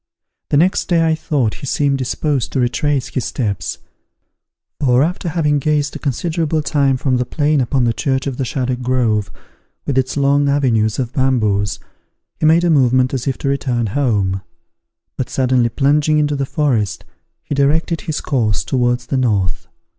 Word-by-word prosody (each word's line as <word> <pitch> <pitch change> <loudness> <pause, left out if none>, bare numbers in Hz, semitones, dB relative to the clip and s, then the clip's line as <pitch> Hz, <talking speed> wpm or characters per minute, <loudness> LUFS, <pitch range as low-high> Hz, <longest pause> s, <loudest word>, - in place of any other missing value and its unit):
The 145 - +2
next 180 +6 +2
day 170 -2 +2
I 160 - +3
thought 140 -8 -1
he 140 - -6
seemed 140 0 +1
disposed 135 0 -1
to - - 0
retrace 135 +2 0
his 130 - -3
steps; 105 -7 -3 1.0
for, 130 -2 +3
after 175 +2 -2
having 150 -3 +1
gazed 150 0 0
a - - -5
considerable 155 +2 -1
time 140 -3 +1
from 130 -1 0
the 125 - +1
plain 145 +2 +1
upon 130 +1 0
the 115 -1 +2
church 130 +2 -1
of 135 -3 -3
the 135 - -1
Shaddock 130 0 -2
Grove, 120 -5 0 0.6
with 135 -2 +1
its 130 +2 -2
long 140 0 +2
avenues 115 -6 +1
of 125 -1 -3
bamboos, 110 -7 +1 0.6
he 155 - +3
made 165 +2 +4
a 175 - +3
movement 130 -3 +3
as 130 -1 -3
if 135 - -1
to - - -4
return 130 -4 0
home; 100 -9 0 0.8
but 130 - -3
suddenly 125 -2 +1
plunging 150 +4 +2
into 150 -1 +1
the 135 -1 -2
forest, 125 - -1 0.4
he - - -4
directed 155 +4 +1
his 155 - -3
course 110 - 0
towards 125 -1 0
the 135 - -1
north. 105 -8 0
135 Hz, 170 wpm, -18 LUFS, 125-145 Hz, 1.0 s, made